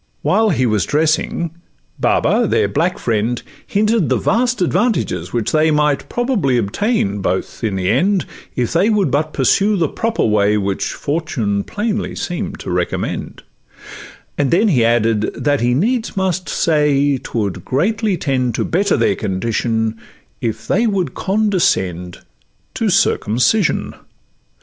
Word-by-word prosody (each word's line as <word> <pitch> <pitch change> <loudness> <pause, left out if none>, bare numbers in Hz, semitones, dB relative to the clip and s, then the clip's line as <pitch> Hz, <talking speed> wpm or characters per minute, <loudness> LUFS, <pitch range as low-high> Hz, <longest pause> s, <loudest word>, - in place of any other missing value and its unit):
While 220 0 +3
he 130 -8 +1
was 105 -6 +1
dressing, 160 +2 0 0.5
Baba, - - +2
their - - +2
black - - 0
friend, 115 +2 -1 0.3
Hinted 210 -3 +1
the - - +2
vast 245 +3 +1
advantages 200 +6 0
which 120 -3 -1
they 155 +1 +3
Might 150 -2 +1
probably 240 - 0
attain 110 - 0
both 95 +5 -3
in 105 -4 0
the 95 -1 -1
end, 190 - +2 0.3
If 125 -2 -1
they 185 +6 +3
would 210 -4 +1
but 155 +2 0
pursue 200 +10 +2
the 165 -3 +2
proper 230 +9 -1
way 105 -1 +2
Which 100 -1 -1
fortune 125 -10 -2
plainly 210 0 -3
seem'd 175 -1 -4
to - - -5
recommend; 90 -1 -3 1.0
And 140 -2 +2
then 205 - +3
he 130 -10 +3
added, 115 -2 +2
that 145 -3 0
he 120 +1 +2
needs 225 - 0
must 185 -1 -1
say, 145 -3 +2
''Twould 100 -6 -3
greatly 200 - 0
tend 130 -6 -1
to - - -1
better 200 +4 +1
their 205 - +2
condition, 110 +2 -1 0.4
If 115 -1 -3
they 230 +5 +2
would 185 - -1
condescend 170 - 0 0.5
to - - 0
circumcision. 125 - +1
145 Hz, 140 wpm, -18 LUFS, -, 1.0 s, While